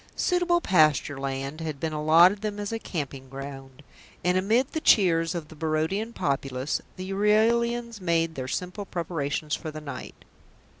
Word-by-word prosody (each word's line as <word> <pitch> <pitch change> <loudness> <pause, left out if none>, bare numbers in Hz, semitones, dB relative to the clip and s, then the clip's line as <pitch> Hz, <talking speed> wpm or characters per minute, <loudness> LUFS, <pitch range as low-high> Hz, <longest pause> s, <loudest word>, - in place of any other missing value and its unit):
Suitable 355 -1 +2
pasture 155 - +3
land 135 +3 -4
had 155 -3 -4
been 160 +1 -2
allotted 165 +6 +5
them 210 -1 -3
as 205 +1 -3
a 225 - -2
camping 140 -9 -5
ground, 135 0 -9 0.4
and 180 +1 +2
amid 220 +8 +2
the 315 - -3
cheers 170 - +4
of 160 -3 -5
the 160 - -12
Barodian 160 +8 -1
populace 135 - -2
the 185 +1 -6
Euralians 230 +2 +2
made 165 -2 +1
their 130 -4 -5
simple 180 +8 -4
preparations 155 -4 -3
for 160 - -6
the 155 0 -7
night. 140 -4 -8
165 Hz, 155 wpm, -26 LUFS, 145-205 Hz, 0.4 s, allotted